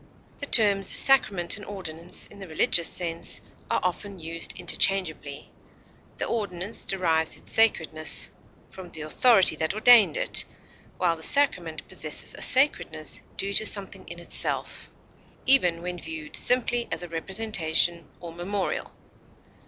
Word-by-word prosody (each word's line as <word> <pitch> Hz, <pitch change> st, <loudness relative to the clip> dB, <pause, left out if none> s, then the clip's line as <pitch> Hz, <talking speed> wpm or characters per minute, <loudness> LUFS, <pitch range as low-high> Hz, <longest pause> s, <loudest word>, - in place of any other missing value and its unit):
The 285 Hz, -, -5 dB
terms 200 Hz, -6 st, +3 dB
sacrament 205 Hz, -11 st, +4 dB
and 205 Hz, -, -10 dB
ordinance, 175 Hz, -3 st, -3 dB
in 205 Hz, -, -12 dB
the 195 Hz, -, -9 dB
religious 165 Hz, +1 st, +2 dB
sense, 165 Hz, -2 st, 0 dB, 0.3 s
are -, -, +1 dB
often 190 Hz, +2 st, -4 dB
used 165 Hz, +1 st, -3 dB
interchangeably; 175 Hz, -5 st, -1 dB, 0.7 s
the -, -, -2 dB
ordinance 205 Hz, -2 st, -4 dB
derives 165 Hz, -4 st, 0 dB
its -, -, -8 dB
sacredness 160 Hz, -8 st, +1 dB, 0.4 s
from 185 Hz, -2 st, -11 dB
the 160 Hz, -, -8 dB
authority 190 Hz, +4 st, +5 dB
that 160 Hz, +5 st, -2 dB
ordained 230 Hz, -, +6 dB
it, -, -, 0 dB, 0.5 s
while 170 Hz, -2 st, +1 dB
the 160 Hz, -, -14 dB
sacrament 170 Hz, -, +2 dB
possesses 155 Hz, -1 st, -5 dB
a -, -, -10 dB
sacredness 250 Hz, -, +1 dB, 0.2 s
due 200 Hz, +1 st, -2 dB
to 220 Hz, -, +2 dB
something 200 Hz, -2 st, -3 dB
in -, -, -9 dB
itself, -, -, -2 dB, 0.6 s
even 180 Hz, -11 st, +4 dB
when 180 Hz, 0 st, -5 dB
viewed 160 Hz, -2 st, -7 dB
simply 245 Hz, -1 st, +1 dB
as -, -, -3 dB
a -, -, -6 dB
representation 170 Hz, -3 st, -1 dB
or 170 Hz, -2 st, -8 dB
memorial. 190 Hz, +3 st, -4 dB
180 Hz, 135 wpm, -25 LUFS, 165-205 Hz, 0.7 s, ordained